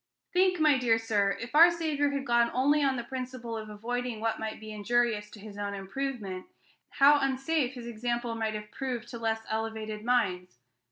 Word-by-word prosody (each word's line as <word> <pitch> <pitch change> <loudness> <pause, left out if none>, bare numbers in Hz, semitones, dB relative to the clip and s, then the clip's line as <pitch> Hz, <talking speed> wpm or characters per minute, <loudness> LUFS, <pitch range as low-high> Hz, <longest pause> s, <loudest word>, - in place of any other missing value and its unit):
Think, 365 0 +3
my 300 -4 +5
dear 235 -3 +3
sir, 205 -3 +1
if 235 +3 -7
our 330 +3 +9
Saviour 310 -4 0
had 280 -1 -3
gone 235 -1 +3
only 290 +4 +3
on 270 -2 +2
the 240 - -3
principle 255 -2 -5
of 215 -1 -6
avoiding 240 +2 -3
what 225 0 -1
might 220 0 -4
be 220 0 -9
injurious 215 0 0
to 210 - -13
his 205 0 -10
own 200 0 -3
improvement, 195 -2 -4 0.4
how 285 +1 +5
unsafe 270 0 0
his 240 -2 -8
example 235 +1 -2
might 220 -1 -2
have 210 0 -7
proved 250 -4 -4
to 235 - -7
less 225 -1 -1
elevated 220 -1 -3
minds. 185 - 0
235 Hz, 185 wpm, -29 LUFS, 215-265 Hz, 0.4 s, our